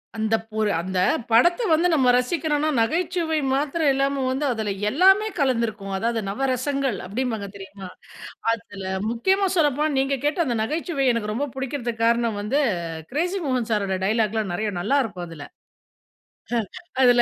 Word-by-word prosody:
அந்த 220 0 +1 0.2
போல் 215 -1 0
அந்த 185 +2 -4 0.3
படத்த, 295 - +5
வந்து 325 +3 +4
நம்ம 260 -5 +4
ரசிக்கிறோம்னா 300 +3 0
நகைச்சுவை 330 +4 0
மாத்திரம் 290 +2 +1
இல்லாம, 275 0 0
வந்து 280 +3 -1
அதுல 220 -3 -2 0.2
எல்லாமே 385 - +5
கலந்திருக்கும். 230 -7 0
அதாவது 230 +3 0
நவரசங்கள் 265 +2 -1
அப்படிம்பாங்க 220 0 -3
தெரியுமா? 195 -1 -9 0.7
அதுல 205 -4 -6 0.3
முக்கியமா 380 +12 +2
சொல்லப்போனா, 300 -1 +2
நீங்க 270 +1 +1
கேட்ட 295 +4 +1
அந்த 240 -3 0
நகைச்சுவை. 305 +3 -1
எனக்கு 215 -2 -2
ரொம்ப 270 +7 -1
பிடிக்கிறதுக்கு 245 -4 -3
காரணம் 235 -2 +1
வந்து 265 +8 +1 0.5
கிரேசி 355 +7 -1
மோகன் 255 -4 0
சாரோட 200 -3 0
டயலாக் 215 +1 +1
எல்லாம் 215 -5 -1
நெறைய 210 +3 -1
நல்லா 265 +11 +2
இருக்கும் 185 -6 -6
அதுல. 160 -3 -9 1.6
அதுல 245 -1 +6
250 Hz, 140 wpm, -23 LUFS, 220-290 Hz, 1.6 s, அதுல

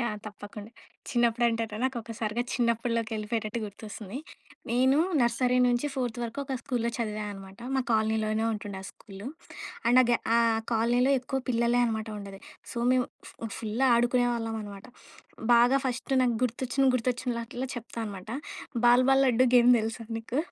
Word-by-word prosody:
Yeah! 235 -3 -1
తప్పకుండ. 205 0 -9 0.4
చిన్నప్పుడంటే‌టే 230 -2 +1
నాకు 260 -1 0
ఒకసారిగా 225 0 -3
చిన్నప్పటిలోకి 230 -1 0
వెళ్ళిపోయేటట్టు 215 +1 -2
గుర్తొస్తుంది. 210 +2 -8 0.5
నేను 260 +4 +4 0.2
నర్సరీ 250 +1 +2
నుంచి 245 +3 +1
ఫోర్త్ 245 -3 -2
వరకు 230 +2 -5
ఒక 270 - -3
స్కూల్లో 245 -4 -1
చదివా 215 -2 -3
అనమాట. 195 -1 -11 0.2
మా 265 - +2
కాలనీలోనే 220 0 +1
ఉంటుండే 205 -2 -5
ఆ - - -11
స్కూలు. 200 +2 -11 0.6
అండ్ 250 +2 +7
ఆ - - +1
గే 235 - +5 0.2
ఆ - - +5 0.3
కాలనీలో 240 +4 +3
ఎక్కువ 255 +2 -3
పిల్లలే 235 0 +2
అనమాట 220 -1 -2
ఉండేది. 195 -1 -9 0.3
సో 240 - -5
మేము 255 -1 +2 0.2
ఫూ 230 - -7
ఫుల్ 225 +4 -1
ఆడుకునేవాళ్ళం 240 -1 +1
అనమాట. 200 -1 -9 0.7
బాగా 240 +3 +5
ఫస్ట్ 255 +2 -3
నాకు 245 -2 +2
గుర్తొచ్చిన 250 +2 0
గుర్తొచ్చినలటిలో 245 +1 -2
చెప్తా 235 0 -8
అనమాట. 195 -1 -8 0.6
బాల్ 245 +1 +6
బాల్ 270 0 +5
లడ్డు 255 0 +4
గేమ్ 245 0 +7
తెలుసా 225 +1 -4
నీకు? 235 +4 -3
235 Hz, 145 wpm, -28 LUFS, 220-245 Hz, 0.7 s, అండ్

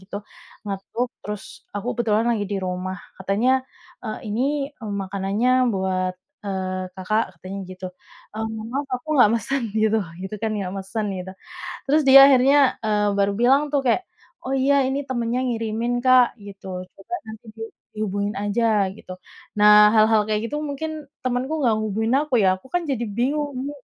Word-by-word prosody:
gitu. 200 +2 -8 0.4
Ngetuk, 200 +5 -3
terus 210 -1 -8
aku 205 +4 -3
kebetulan 225 -1 +1
lagi 220 -3 0
di 200 - -1
rumah, 185 0 -4 0.2
katanya, 225 +8 +1 0.4
"Eee, 215 - -5
ini, 275 +6 0
eee, 225 -7 -8
makanannya 205 +7 +1
buat, 185 -2 -1 0.3
eee, 185 -2 -3
Kakak." 215 +4 0
katanya 190 +4 -7
gitu, 185 0 -7 0.5
"Eee, 220 +1 -3
mohon 220 0 -6
maaf 280 0 -2
aku 250 - -17
nggak 245 -6 +6
mesen." 260 +4 -1
gitu 220 0 +3 0.2
gitu, 190 +2 -5
kan, 220 - 0
nggak 185 -2 -3
mesen 195 +3 -3
gitu. 185 0 -6 0.6
Terus 305 +3 +4
dia 270 0 +10
akhirnya, 270 +1 +5
eee, 210 -1 +2
baru 200 0 +2
bilang 265 +4 +5
tuh 280 - +3
kayak, 255 +10 +2 0.4
"Oh 265 - -2
iya 275 +1 +3
ini 265 +1 -1
temennya 240 -1 -1
ngirimin, 230 0 -1
Kak," 255 -1 +5
gitu, 195 -2 -8
"coba 195 - -12
nanti 220 +1 -10
di 225 - -11 0.4
dihubungin 205 -1 -2
aja." 205 0 +1
Gitu. 185 - -10 0.5
Nah, 210 0 +8
hal-hal 220 0 +5
kayak 215 +1 -1
gitu 295 0 -2
mungkin 300 0 -5 0.2
temenku 255 +4 -1
nggak 225 -2 +3
hubungin 220 +2 -1
aku, 300 -3 -9
ya, 185 -1 +4
aku, 190 +7 -16
kan, 355 - +2
jadi 240 -3 -1
bingung, 290 +4 0
ini 280 +3 -4
220 Hz, 165 wpm, -23 LUFS, 200-255 Hz, 0.6 s, dia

